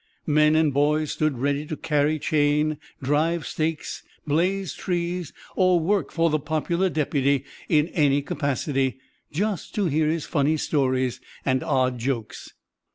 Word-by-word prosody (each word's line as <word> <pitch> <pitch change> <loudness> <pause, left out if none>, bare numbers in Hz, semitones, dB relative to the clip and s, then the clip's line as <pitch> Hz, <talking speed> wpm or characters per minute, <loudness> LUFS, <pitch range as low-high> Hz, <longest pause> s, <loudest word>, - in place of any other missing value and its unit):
Men 150 0 +4
and 155 -3 +3
boys 150 +2 +2
stood 155 -4 0
ready 140 +3 0
to 155 - -4
"carry 150 0 +1
chain," 150 0 +1 0.2
drive 155 +4 +1
stakes, 160 0 -3 0.2
blaze 180 +4 0
trees, 175 -2 -2 0.2
or 185 -2 +4
work 175 -2 0
for 165 -1 +2
the 155 - +2
popular 165 +5 0
deputy 140 -3 +1 0.2
in 155 -1 +3
any 145 -3 +2
capacity 135 -2 -1 0.3
just 195 +2 -2
to 205 - +1
hear 155 -1 +1
his 160 0 -1
funny 150 0 +1
stories 130 -4 0 0.2
and 130 -1 +2
odd 130 -5 +1
jokes. 120 -2 -4
150 Hz, 140 wpm, -24 LUFS, 140-165 Hz, 0.3 s, Men